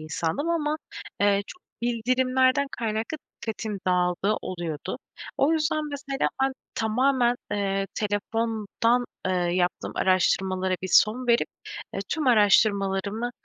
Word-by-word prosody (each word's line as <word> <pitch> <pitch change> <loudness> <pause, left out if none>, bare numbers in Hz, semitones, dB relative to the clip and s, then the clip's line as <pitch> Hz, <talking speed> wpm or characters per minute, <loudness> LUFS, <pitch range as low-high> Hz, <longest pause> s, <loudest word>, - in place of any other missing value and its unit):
insandım. 160 - -2
Ama, 305 -2 0 0.4
eee, 200 0 +3
çok 365 - -12 0.2
bildirimlerden 255 +3 +2
kaynaklı, 225 +5 -2 0.3
dikkatim 220 -2 -4
dağıldığı 180 +3 +2
oluyordu. 170 -5 -4 0.4
O 280 +4 +4
yüzden 310 -1 +1
mesela, 280 -1 -1
ben 270 - +2 0.2
tamamen, 245 +2 +2 0.2
eee, 195 -1 0
telefondan, 225 +3 0 0.2
eee, 185 - +1
yaptığım 175 0 0
araştırmalara 185 0 +2
bir 190 - -3
son 240 +4 +4
verip, 235 -1 +3 0.5
ııı, - - -2
tüm 310 -2 -1
araştırmalarımı, 205 -1 +3
220 Hz, 110 wpm, -26 LUFS, 195-255 Hz, 0.5 s, O